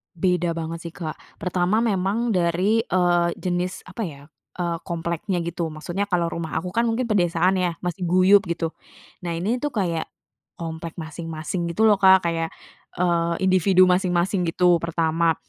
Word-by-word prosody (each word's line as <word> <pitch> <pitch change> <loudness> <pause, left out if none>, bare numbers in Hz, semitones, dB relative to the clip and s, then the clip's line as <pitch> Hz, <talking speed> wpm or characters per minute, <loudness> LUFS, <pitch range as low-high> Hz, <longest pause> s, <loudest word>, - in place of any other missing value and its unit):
Beda 175 -1 +1
banget 165 0 -4
sih 165 - -8
Kak, 160 -4 -6 0.2
pertama, 180 +5 +1
memang 215 +2 0
dari, 185 +4 +2
eee, 175 -1 +2
jenis 180 0 -3
apa 185 +5 -7
ya, 140 -3 -9 0.3
eee, 170 -2 -2
kompleknya 170 +2 -2
gitu. 170 0 -3
Maksudnya 175 +6 -3
kalau 175 -3 0
rumah 170 -2 -4
aku 180 +2 -2
kan 235 +4 +1
mungkin 235 +1 -1
pedesaan 180 -1 +2
ya, 180 -2 0
masih 180 0 -3
guyub 185 +3 +6
gitu. 165 -1 -2 0.6
Nah, 170 - -2
ini 205 +9 -1
tuh 290 0 -3
kayak 170 -6 -1 0.5
komplek 165 0 -6
masing-masing 165 +2 -4
gitu 220 - +1
loh 215 -3 +5
Kak, 190 -1 +6
kayak, 165 -1 -1 0.4
eee, 170 -1 +1
individu 185 0 +4
masing-masing, 180 0 +1
gitu 175 0 +4
pertama. 165 0 +1
175 Hz, 155 wpm, -23 LUFS, 170-190 Hz, 0.6 s, guyub